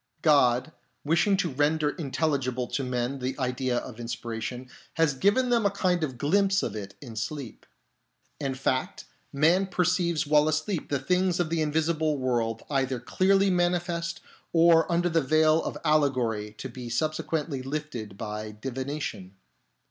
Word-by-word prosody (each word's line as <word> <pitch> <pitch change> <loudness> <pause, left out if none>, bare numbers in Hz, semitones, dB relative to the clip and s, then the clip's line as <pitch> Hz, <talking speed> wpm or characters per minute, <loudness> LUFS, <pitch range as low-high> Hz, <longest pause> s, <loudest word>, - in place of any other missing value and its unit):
God, 135 -3 +4 0.3
wishing 175 +6 +3
to 180 -3 0
render 150 +2 +1
intelligible 135 -5 -1
to 140 - -2
men 125 +1 -2
the 130 +1 -3
idea 125 -1 -1
of 120 -2 -6
inspiration, 120 +1 -5 0.3
has 160 -3 +3
given 205 - +2
them 235 -2 +3
a 200 - +4
kind 185 -3 0
of 130 -5 -3
glimpse 195 +7 +2
of - - -3
it 100 -2 -7
in 120 -5 -9
sleep. 115 +2 -5 0.7
In 135 -2 -2
fact, 130 -1 -2 0.3
man 165 +7 +3
perceives 180 -3 +1
while 150 +1 +4
asleep 155 +3 -1
the 140 - +1
things 180 +6 +1
of 170 -2 0
the 165 -1 +1
invisible 155 0 +1
world 120 -4 -1
either 135 -3 0
clearly 195 +9 +2
manifest 175 -1 0 0.3
or 165 0 +5
under 175 +1 +2
the 165 -1 +2
veil 155 +3 +3
of - - -4
alle 150 -2 +4
gory 110 -5 -2
to - - -5
be 125 -1 -8
subsequently 155 +2 -2
lifted 130 -7 -5
by 105 0 -5
divination. 130 -6 -5
150 Hz, 150 wpm, -27 LUFS, 125-170 Hz, 0.7 s, or